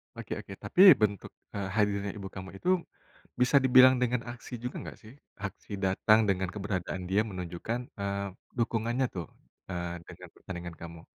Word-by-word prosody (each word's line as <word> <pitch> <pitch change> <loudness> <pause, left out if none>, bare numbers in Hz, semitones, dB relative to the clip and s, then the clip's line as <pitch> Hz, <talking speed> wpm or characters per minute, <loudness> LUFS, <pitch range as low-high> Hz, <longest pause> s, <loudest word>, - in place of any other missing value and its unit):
Oke - - -9
oke - - -9
tapi 185 - +2 0.2
bentuk, 100 -2 0 0.2
eee, 100 -2 -3
hadirnya 100 -2 +1
ibu 95 -1 -6
kamu 95 0 -7
itu, 180 - -2 0.7
bisa 125 +3 +4
dibilang 130 0 +8
dengan 125 -1 +1
aksi 120 +1 -11
juga 125 - -4
gak - - -9
sih? 110 +2 -13 0.3
Aksi 100 - -8 0.2
datang 105 +3 +4
dengan 95 -1 +1
keberadaan 95 -3 -3
dia 100 +3 +3
menunjukkan, 90 +6 -4 0.2
eee, 100 0 -2 0.3
dukungannya 115 +2 0
tuh, 85 - -4 0.4
eee, 85 -1 -3
dengan - - -11
pertandingan 85 -2 -7
kamu. 85 -1 -9
100 Hz, 155 wpm, -30 LUFS, 95-115 Hz, 0.7 s, dibilang